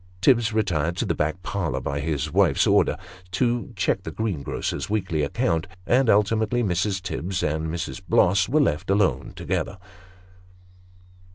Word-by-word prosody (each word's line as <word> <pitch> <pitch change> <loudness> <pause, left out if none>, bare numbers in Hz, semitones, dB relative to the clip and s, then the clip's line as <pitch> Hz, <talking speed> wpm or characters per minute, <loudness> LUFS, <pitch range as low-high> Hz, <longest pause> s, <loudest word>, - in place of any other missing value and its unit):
Tibbs 115 +1 +4
retired 85 -7 0
to - - 0
the - - 0
back 80 +4 -2
parlour 80 -10 -2
by 70 +2 -3
his 75 0 -2
wife's 95 -2 +3
orders, - - +3 0.4
to 120 +5 0
check - - 0
the - - -6
greengrocer's 100 -8 -3
weekly 95 -7 -1
account; 80 +4 0 0.2
and 125 +2 +3
ultimately 110 +3 +2
Mrs. 95 0 0
Tibbs 90 0 -3
and 80 +1 -1
Mrs. 85 +3 -4
Bloss 90 +5 +3
were 150 +4 +3
left 85 - 0
alone 100 0 +1
together. - - -3
95 Hz, 145 wpm, -24 LUFS, 80-110 Hz, 0.4 s, Tibbs